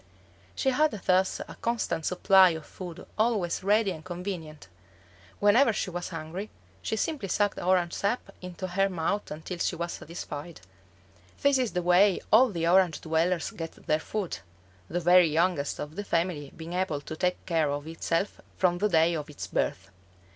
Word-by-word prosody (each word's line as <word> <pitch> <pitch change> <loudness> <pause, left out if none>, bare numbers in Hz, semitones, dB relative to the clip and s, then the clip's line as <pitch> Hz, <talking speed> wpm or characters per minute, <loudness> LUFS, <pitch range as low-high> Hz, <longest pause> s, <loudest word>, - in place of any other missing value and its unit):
She 265 - +1
had 305 +4 +3
thus 185 +1 +2
a - - -9
constant 220 -9 -1
supply 190 0 +6
of 155 - -11
food 175 -3 -9
always 215 -7 +1
ready 205 +1 +3
and 160 -3 -8
convenient; 175 - -6 0.7
whenever 225 +5 +5
she 195 - -3
was 175 0 -4
hungry 170 +5 -6 0.3
she - - -2
simply 285 -2 -2
sucked 205 +1 +1
orange 180 -1 +2
sap 200 0 -2
into 180 +1 -6
her 195 +2 +2
mouth 185 +3 -2
until 160 +4 -6
she - - 0
was 170 +1 -3
satisfied. 165 - -7 0.8
This 280 -1 +4
is 250 -4 -1
the 180 -1 -1
way 180 +2 +5
all 250 +4 +7
the 170 -5 -1
Orange 180 -2 +4
dwellers 165 +2 0
get 165 -7 -6
their 155 - +2
food, 195 - -4 0.5
the 175 - -2
very 175 0 +6
youngest 160 -2 +1
of 150 +1 -6
the 205 - -4
family 165 -6 -1
being 165 +1 -7
able 180 -6 -1
to 155 - -7
take 180 +2 -1
care 165 -4 +1
of 145 +1 -3
itself 165 +4 -2 0.2
from 175 -2 +2
the 210 +2 +2
day 165 -1 +4
of 150 -2 -4
its 150 - -6
birth. 95 - -2
180 Hz, 170 wpm, -28 LUFS, 165-195 Hz, 0.8 s, all